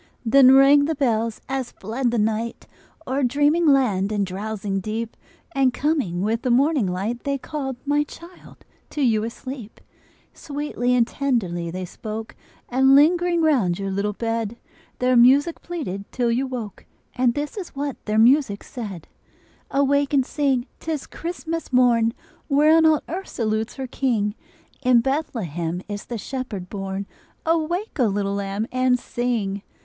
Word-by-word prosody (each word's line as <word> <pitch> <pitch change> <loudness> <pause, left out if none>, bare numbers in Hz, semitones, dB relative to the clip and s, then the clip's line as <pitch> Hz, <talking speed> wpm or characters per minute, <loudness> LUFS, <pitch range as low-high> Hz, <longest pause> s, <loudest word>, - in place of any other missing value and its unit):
Then 260 +2 +7
rang 280 +1 +6
the 320 +1 -1
bells 230 -5 0
as 265 -2 -3
fled 240 +5 -2
the 235 - -1
night 220 +2 -1 0.4
O'er 265 +2 -1
dreaming 290 +6 +2
land 215 -9 +3
and 205 -2 0
drowsing 195 +1 -3
deep, 220 +3 -4 0.4
And 270 -5 +2
coming 270 - 0
with 225 +2 0
the 255 - -1
morning 270 -1 +3
light, 200 +7 -3
They 280 0 -1
called, 270 -1 -5
my 290 +1 +2
child, 340 +4 -14 0.2
to 295 - -2
you 220 -4 +2
asleep. 235 0 -7 0.5
Sweetly 285 -4 -2
and 240 -2 +4
tenderly 195 -13 -1
they 185 +2 -4
spoke, 220 +4 -7 0.3
And 265 +2 +4
lingering 345 +3 +4
round 235 - +2
your 195 -1 -3
little 200 +2 -1
bed, 225 0 -2 0.4
Their 255 0 +2
music 275 +7 +5
pleaded 235 - -5
till 240 -2 0
you 255 +3 0
woke, 235 -6 -7 0.3
And 245 -2 +2
this 290 0 -3
is 385 -8 -7
what 280 -1 -4
their 215 0 0
music 235 -2 +4
said: 205 - -7 0.6
"Awake 280 +1 +2
and 265 -2 +3
sing! 270 -4 0
'tis 315 -3 -3
Christmas 330 -2 -5
morn, 235 -2 +3 0.3
Whereon 310 +3 +5
all 310 -2 +3
earth 375 +4 -5
salutes 220 -1 -2
her 265 - -4
King! 230 -5 0 0.5
In 250 -3 +5
Bethlehem 185 - -2
is 205 -1 -6
the 240 - -5
Shepherd 215 -6 -5
born. 195 -1 -4 0.4
Awake, 330 +4 -1
O 245 - +4
little 200 -1 -1
lamb, 200 +1 -2
and 255 0 +2
sing!" 230 -5 -2
245 Hz, 150 wpm, -23 LUFS, 215-280 Hz, 0.6 s, Then